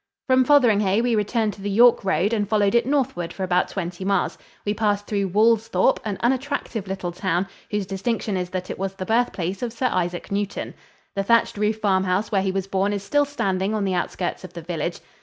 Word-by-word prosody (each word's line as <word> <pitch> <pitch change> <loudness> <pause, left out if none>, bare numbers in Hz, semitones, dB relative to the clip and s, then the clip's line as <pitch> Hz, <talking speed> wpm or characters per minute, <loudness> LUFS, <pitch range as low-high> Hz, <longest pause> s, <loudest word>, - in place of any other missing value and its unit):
From 260 0 +4
Fotheringhay 220 -7 +4
we 245 -1 +1
returned 215 0 0
to 200 - -13
the 205 - -3
York 235 +4 +5
road 190 +3 +1
and 205 -3 0
followed 205 -2 +2
it 235 0 +3
northward 265 -12 0
for 190 - -5
about 180 -1 +2
twenty 180 -1 -5
miles. 195 +1 0 0.3
We 205 - +1
passed 205 -1 0
through 200 -2 -1
Woolsthorpe, 225 +5 +3
an 205 -3 -3
unattractive 255 -4 -1
little 190 -2 -3
town 180 +1 -1 0.2
whose 210 -2 -1
distinction 200 +2 -2
is 180 -1 -2
that 185 0 -4
it - - -7
was 195 0 -3
the 185 - -5
birthplace 195 -5 0
of 240 -2 -2
Sir 250 +2 0
Isaac 175 0 -2
Newton. 200 0 -3 0.4
The 195 - +1
thatched 230 +4 +3
roof 210 +1 0
farmhouse 190 0 +1
where 195 -2 +2
he 190 0 0
was 190 0 -2
born 195 +1 0
is 200 -1 -3
still 290 +7 +2
standing 200 -7 -1
on 210 -2 0
the 190 - 0
outskirts 180 +1 -2
of 185 - -10
the 170 - -8
village. 170 0 -3
200 Hz, 210 wpm, -23 LUFS, 190-225 Hz, 0.4 s, York